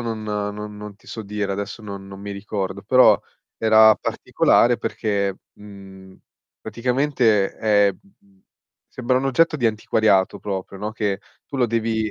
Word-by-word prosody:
non 115 Hz, -2 st, -4 dB
non 105 Hz, 0 st, -4 dB
non 105 Hz, -1 st, -9 dB
ti -, -, -26 dB
so 110 Hz, -, -7 dB
dire, 100 Hz, -1 st, -3 dB
adesso 100 Hz, +3 st, -5 dB
non 100 Hz, -2 st, -8 dB
non 95 Hz, 0 st, -10 dB
mi 100 Hz, 0 st, -7 dB
ricordo, 100 Hz, -1 st, -4 dB
però 125 Hz, +4 st, +5 dB, 0.4 s
era 110 Hz, -1 st, +6 dB
particolare 120 Hz, 0 st, +2 dB
perché, 100 Hz, -3 st, -2 dB, 0.2 s
mhmm, 95 Hz, -2 st, -14 dB, 0.5 s
praticamente 125 Hz, -5 st, +1 dB
è, 105 Hz, -2 st, +3 dB
mhmm, 100 Hz, -, -27 dB, 0.5 s
sembra 125 Hz, 0 st, 0 dB
un 135 Hz, -, -2 dB
oggetto 160 Hz, +4 st, +2 dB
di 120 Hz, -, +1 dB
antiquariato 110 Hz, -3 st, +1 dB
proprio, 95 Hz, -1 st, -5 dB
no, 105 Hz, +2 st, -4 dB
che 105 Hz, -2 st, -2 dB, 0.3 s
tu 140 Hz, -, -7 dB
lo 125 Hz, -, +3 dB
devi 110 Hz, -1 st, -1 dB
105 Hz, 150 wpm, -22 LUFS, 100-115 Hz, 0.5 s, era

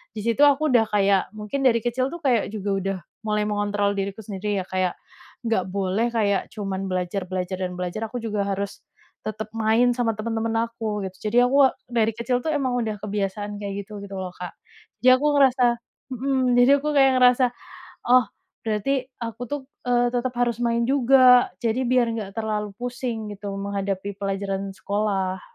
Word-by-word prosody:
di -, -, -4 dB
situ 235 Hz, +4 st, +1 dB
aku 290 Hz, +2 st, +4 dB
udah 235 Hz, -3 st, +5 dB
kayak, 200 Hz, -2 st, +3 dB
mungkin 210 Hz, +6 st, -4 dB
dari 235 Hz, -3 st, +4 dB
kecil 255 Hz, +2 st, 0 dB
tuh 340 Hz, -, -6 dB
kayak 245 Hz, -6 st, +2 dB
juga 205 Hz, -2 st, -3 dB
udah 195 Hz, 0 st, -2 dB, 0.3 s
mulai 210 Hz, -1 st, 0 dB
mengontrol 205 Hz, -1 st, 0 dB
diriku 195 Hz, +1 st, -3 dB
sendiri 205 Hz, 0 st, -2 dB
ya -, -, -17 dB
kayak, 185 Hz, -1 st, 0 dB, 0.5 s
nggak 225 Hz, -5 st, +1 dB
boleh 200 Hz, +3 st, 0 dB
kayak 205 Hz, -4 st, +1 dB
cuman 195 Hz, -2 st, -3 dB
belajar, 185 Hz, +1 st, -2 dB
belajar, 185 Hz, 0 st, -3 dB
dan 180 Hz, -1 st, -3 dB
belajar, 180 Hz, +5 st, -3 dB
aku 245 Hz, -, -3 dB
juga 210 Hz, -3 st, -1 dB
harus 200 Hz, 0 st, -3 dB, 0.5 s
tetap 215 Hz, 0 st, -4 dB
main 225 Hz, +2 st, +3 dB
sama 230 Hz, -3 st, 0 dB
temen-temen 225 Hz, +1 st, -2 dB
aku, 220 Hz, -3 st, -4 dB
gitu. 190 Hz, +3 st, -6 dB
Jadi 235 Hz, -, +1 dB
aku 275 Hz, +2 st, +5 dB, 0.2 s
dari 225 Hz, -2 st, +2 dB
kecil 235 Hz, +2 st, 0 dB
tuh 315 Hz, -, 0 dB
emang 265 Hz, -3 st, 0 dB
udah 220 Hz, -2 st, -2 dB
kebiasaan 205 Hz, 0 st, -3 dB
kayak 200 Hz, 0 st, -4 dB
gitu, 210 Hz, +1 st, -9 dB
gitu 200 Hz, -, -10 dB
loh 185 Hz, -1 st, -4 dB
Kak, 180 Hz, -1 st, -6 dB, 0.5 s
jadi 255 Hz, 0 st, +8 dB
aku 295 Hz, -, -1 dB
ngerasa 260 Hz, -2 st, +4 dB, 0.5 s
mhm, 260 Hz, +1 st, 0 dB, 0.2 s
jadi 245 Hz, +2 st, +6 dB
aku 300 Hz, -, 0 dB
kayak 270 Hz, -1 st, +6 dB
ngerasa, 250 Hz, 0 st, +5 dB, 0.6 s
"Oh 250 Hz, 0 st, +6 dB, 0.4 s
berarti 230 Hz, +5 st, 0 dB, 0.2 s
aku 230 Hz, +1 st, -5 dB
tuh, 290 Hz, +3 st, -3 dB, 0.3 s
eee, 245 Hz, 0 st, +3 dB
tetap 245 Hz, +1 st, -1 dB
harus 240 Hz, -2 st, +1 dB
main 235 Hz, 0 st, +1 dB
juga, 255 Hz, -2 st, +6 dB
jadi 235 Hz, +2 st, +1 dB
biar 250 Hz, -1 st, +3 dB
nggak 200 Hz, -3 st, -5 dB
terlalu 210 Hz, -2 st, -2 dB
pusing 245 Hz, -3 st, -4 dB
gitu 200 Hz, 0 st, -6 dB
menghadapi 200 Hz, 0 st, -3 dB
pelajaran 195 Hz, 0 st, -3 dB
sekolah." 195 Hz, -2 st, -1 dB
215 Hz, 175 wpm, -24 LUFS, 200-245 Hz, 0.6 s, jadi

